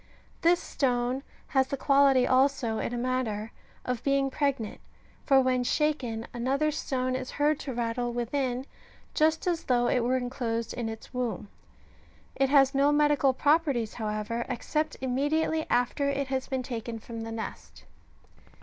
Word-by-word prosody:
This 345 +1 +4
stone 250 -1 -1 0.3
has 265 -1 +2
the 275 - -3
quality 275 -2 +4
also, 260 -4 +2
in - - -2
a 245 - -3
manner, 240 -3 -2 0.3
of 250 -2 -2
being 275 -1 +1
pregnant, 270 -7 -1 0.5
for 270 -2 +6
when 255 -1 +2
shaken, 245 -6 0
another 270 +5 0
stone 255 -4 -2
is 255 0 -4
heard 295 +1 +1
to 270 -2 -5
rattle 240 +1 -1
within, 250 +1 -2 0.5
just 315 +1 +2
as 345 -2 -1
though 245 -1 +2
it 250 - +2
were 245 +2 +1
enclosed 235 -2 -3
in 235 -2 -3
its 220 0 -9
womb; 235 -6 -3 0.9
it 270 -1 +2
has 275 -1 +5
no 280 +1 +4
medical 295 -2 +3
properties, 280 -5 +1
however, 215 +1 -3
except 305 +5 -2
immediately 290 +5 0
after 245 +4 +1
it 280 -1 -2
has 265 -1 -2
been 260 -2 -2
taken 235 -2 -5
from 225 +1 -8
the 225 0 -5
nest. 225 0 -7
255 Hz, 150 wpm, -28 LUFS, 240-280 Hz, 0.9 s, for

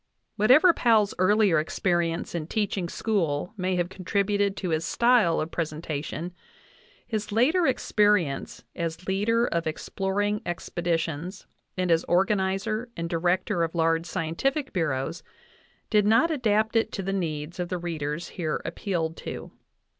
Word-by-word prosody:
Whatever 260 - +6
Powell's 220 -7 +3
earlier 195 -3 +4
experience 170 +1 -1
in 165 -3 -3
teaching 195 -3 -1
school 175 -6 -1
may 185 -2 -1
have 175 -1 0
con 185 0 -11
tributed 200 +1 +1
to 185 - -3
his 160 0 0
style 235 -4 +3
of 155 +2 -3
presentation, 155 +1 -4 0.7
his 215 -3 -3
later 305 - +3
experience 210 - +1
as 165 +1 -4
leader 220 +5 +2
of 170 -7 -1
exploring 200 +5 -1
expeditions 170 0 -3 0.3
and 180 -1 +1
as 165 0 +3
organizer 195 +5 +1
and 170 0 -3
director 175 +2 +1
of 165 0 -1
large 165 0 +1
scientific 225 - -2
bureaus 155 -1 -1 0.7
did 210 -2 +4
not 230 +10 +4
adapt 220 -6 +1
it 225 -1 +2
to 195 - -3
the 195 +1 -2
needs 160 -2 -3
of 175 -1 -2
the 180 - -1
readers 165 -2 -4
here 160 -4 -2
appealed 165 -5 -2
to. - - -7
185 Hz, 140 wpm, -26 LUFS, 165-210 Hz, 0.7 s, Whatever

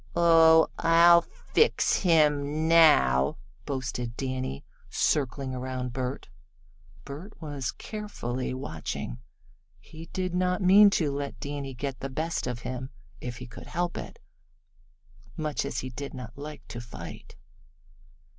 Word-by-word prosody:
"Oh, 165 -1 +6
I'll 170 +1 +7
fix 455 - +1
him 150 -3 +2
now," 145 - +5 0.3
boasted 125 -3 -4
Danny, 130 - -4 0.2
circling 135 -1 0
around 130 -1 -4
Bert. 130 +1 -4 0.8
Bert 165 +10 -9
was 145 -5 -4
carefully 130 - -5
watching. 80 - -5 0.6
He 160 +1 -12
did 185 0 -3
not 180 0 +1
mean 200 +2 +7
to 150 -4 0
let 140 0 -4
Danny 140 -2 -5
get 135 0 -4
the 135 - -4
best 160 +2 -2
of 120 -1 -4
him 130 +1 -5 0.3
if 125 -1 -6
he 125 - -8
could 120 - -11
help 175 0 -2
it, - - -7 1.2
much 155 -2 -2
as - - -3
he 130 - -6
did 140 +3 -7
not 125 -2 -8
like 150 +1 -9
to 120 - -6
fight. 120 - -10
140 Hz, 125 wpm, -28 LUFS, 125-165 Hz, 1.2 s, I'll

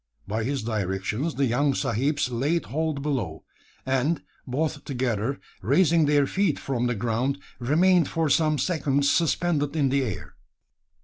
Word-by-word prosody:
By 110 +2 -2
his 135 -2 -2
directions 105 - -2
the 140 - +2
young 135 +3 +1
sahibs 135 +4 0
laid 145 +8 0
hold 155 -2 -2
below; 115 - -2 0.4
and, 135 +5 0 0.2
both 145 +3 -2
together, 125 -1 -2 0.2
raising 160 +3 +3
their 145 -1 +4
feet 190 +1 +1
from 125 -3 -1
the 120 - 0
ground, 120 +5 -1 0.2
remained 165 +6 +3
for 165 -1 0
some 155 +1 +3
seconds 140 -3 +1
suspended 160 -3 +1
in 140 -4 +2
the 140 +1 +2
air. 110 -8 -5
140 Hz, 140 wpm, -25 LUFS, 120-155 Hz, 0.4 s, their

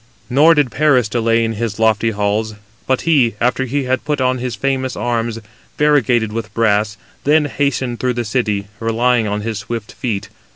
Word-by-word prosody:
Nor 155 +6 +6
did 145 -5 +2
Paris 140 -6 +3
delay 115 +1 +1
in 115 - -2
his 110 -1 -3
lofty 110 0 +2
halls; 105 +1 -1 0.3
but 130 -1 +1
he, 135 -9 +2
after 125 +2 +1
he 140 +3 -1
had 130 0 -1
put 150 -2 -1
on 130 0 +1
his 125 -2 -3
famous 130 +2 -1
arms, 115 -1 -2 0.4
variegated 120 -7 +2
with 110 -1 -4
brass, 105 -2 +1 0.3
then 150 +1 +3
hastened 130 -4 -1
through 125 -1 0
the 120 -1 -2
city, 105 -4 -1
relying 115 0 +1
on 105 +1 -2
his 110 -1 -3
swift 110 0 -6
feet. 110 -6 -3
120 Hz, 175 wpm, -17 LUFS, 110-130 Hz, 0.4 s, Nor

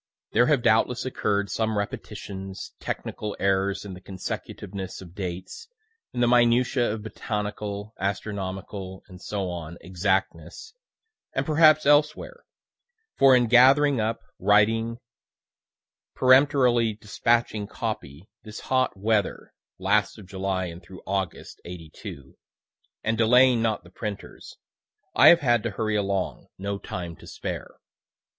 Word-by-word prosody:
There 120 +2 +4
have 140 -6 +2
doubtless 120 +3 +2
occurr'd 100 -5 -1
some 110 -1 -1
repetitions, 95 -1 -6
technical 105 -1 -5
errors 100 +1 0
in 100 - -7
the 90 - -11
consecutiveness 95 0 -6
of 85 -3 -12
dates, 95 - -6 0.4
in 125 - -3
the 120 - +4
minutiae 120 0 +3
of 110 -1 -6
botanical, 105 -1 -4
astronomical, 95 -1 -4
&c., 90 -4 -5
exactness, 90 - -2 0.6
and - - 0
perhaps 155 -1 +5
elsewhere; 150 - +2 0.7
for 135 -1 +6
in 125 -1 +4
gathering 130 +3 +5
up, 110 +1 -2 0.2
writing, 110 +4 +3 1.2
peremptorily 130 -3 +4
dispatching 110 0 0
copy, 75 +2 -5
this 110 0 -9
hot 130 -5 0
weather, 105 +1 -1 0.2
(last 100 +4 +1
of 105 - -11
July 95 0 -2
and 85 0 -8
through 95 -2 -13
August, 95 -3 -4
'82,) 80 -5 -10 0.7
and 115 0 0
delaying 125 +1 +5
not 110 -2 0
the - - -17
printers, 105 -3 -7 0.6
I - - +7
have 170 -1 +8
had 120 -4 +3
to 120 - -2
hurry 110 +1 -2
along, 100 -2 -2
no 100 +1 -4
time 85 -3 -6
to - - -14
spare. - - -6
105 Hz, 120 wpm, -25 LUFS, 95-120 Hz, 1.2 s, have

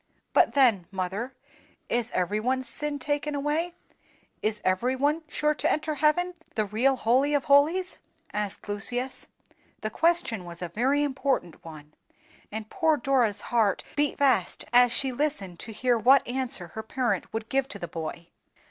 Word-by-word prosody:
"But - - +4
then, 230 -10 +4
mother, 200 +7 -4 0.5
is 240 -1 0
every 185 +4 0
one's 260 +3 0
sin 295 +4 0
taken 290 +1 -2
away, 305 +5 -1 0.7
is 215 0 -1
every 235 +8 +1
one 290 +5 +1
sure 300 0 +1
to - - 0
enter 310 0 -1
heaven, 310 +5 +2 0.2
the 215 -2 +1
real 235 +7 +2
Holy 260 +5 +2
of 285 - +1
holies?" 315 +7 +3 0.4
asked 210 -1 -4
Lucius. 245 +6 -2 0.5
The 215 - -3
question 330 - +1
was 175 0 -8
a 175 - -4
very 265 - +1
important 265 - -1
one, 155 -2 -11 0.6
and 215 0 -5
poor 320 - +2
Dora's 240 -6 +1
heart 215 -5 +2
beat 290 -1 0
fast 255 -10 +2
as 245 0 +6
she 265 +2 +3
listened 240 - -2
to 225 - -7
hear 245 +2 +1
what 265 +5 +5
answer 245 -8 -2
her 220 - -6
parent 245 +2 -2
would 225 0 -4
give 270 +1 0
to 210 - -6
the 175 - -6
boy. 165 +1 -6
250 Hz, 160 wpm, -27 LUFS, 210-285 Hz, 0.7 s, as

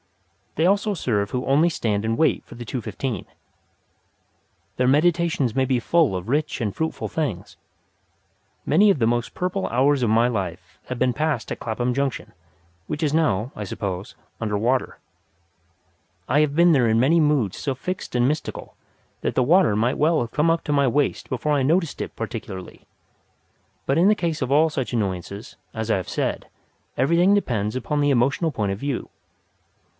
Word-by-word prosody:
They 160 - +2
also 205 +2 +2
serve 105 - -1
who 125 +2 -3
only 150 +5 +3
stand 105 -9 -1
and 115 +1 -1
wait 160 - +2
for - - -13
the 120 0 -8
two 125 +2 -4
fifteen. 110 0 -4 1.5
Their 125 - +1
meditations 155 -3 +2
may 135 - +2
be 130 -1 +1
full 160 - +2
of 90 +1 -4
rich 150 +4 -1
and 105 -5 -2
fruitful 160 0 -3
things. 145 - -4 1.1
Many 200 +8 +5
of 195 - +3
the 115 - +3
most 120 0 -1
purple 185 +1 -2
hours 135 +2 +2
of 115 - +2
my 115 +2 +4
life 95 -6 -5
have 130 -1 -5
been 130 -1 +2
passed 150 -4 -2
at - - -10
Clapham 120 +2 -2
Junction, 140 0 -2 0.5
which 150 - -4
is 150 -2 +1
now, 125 -8 +1
I 105 - -5
suppose, 95 -1 -5 0.3
under 105 -2 -1
water. 125 +5 0 1.3
I 145 - +3
have 145 -2 0
been 170 +1 +5
there 125 -5 +3
in 110 +1 +3
many 150 +7 +4
moods 145 -10 +1
so 140 - -2
fixed 185 +8 -5
and 120 0 +3
mystical 150 +3 -4 0.5
that - - -2
the 130 - +3
water 170 - +4
might 120 +5 0
well 155 +2 +3
have 115 -1 -3
come 155 +2 +2
up 165 0 +1
to 150 - 0
my 140 -1 +3
waist 145 +3 0
before 150 +4 -1
I 140 -2 +2
noticed 165 +3 +1
it - - -6
particularly. 95 -1 -7 1.0
But 135 +4 +1
in 185 +4 +5
the 210 - +4
case 170 -6 -2
of 130 0 -2
all 155 +3 +4
such 135 -5 -3
annoyances, 100 -1 -3 0.2
as 110 0 -4
I - - +3
have 95 - -5
said, - - -2 0.5
everything 170 +9 +4
depends 110 - -1
upon 145 +4 -1
the 145 - +3
emotional 135 +5 +2
point 105 -7 -1
of 100 - -7
view. 140 -1 -3
130 Hz, 180 wpm, -23 LUFS, 115-155 Hz, 1.5 s, Many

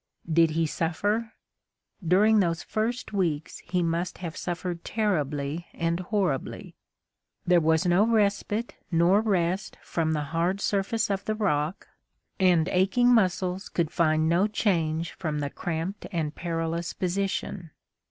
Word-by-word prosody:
Did 165 0 +5
he 165 - +3
suffer? 205 +9 -1 0.7
During 205 +6 +4
those 170 -3 0
first 225 +1 -2
weeks 165 -6 -1
he 180 -1 -1
must 170 +2 -1
have 170 -2 -6
suffered 175 -1 -4
terribly 155 -6 -1
and 170 +1 -1
horribly. 185 -7 -2 0.7
There 175 -1 +4
was 160 +2 +2
no 180 +5 +4
respite 215 +1 +1 0.2
nor 175 +5 +4
rest 190 -2 0
from 160 -1 -1
the 150 -1 -1
hard 175 +4 +1
surface 205 +2 0
of 195 -1 -2
the 215 - -1
rock, 170 -5 -1 0.5
and 180 -3 +4
aching 220 +7 +3
muscles 185 -3 +1
could 165 -3 -1
find 155 -2 +2
no 175 +5 +3
change 165 -7 0
from 155 -4 -3
the 145 -1 -2
cramped 175 +4 -4
and 155 -4 -2
perilous 165 0 -3
position. 185 -1 -2
175 Hz, 135 wpm, -27 LUFS, 165-200 Hz, 0.7 s, Did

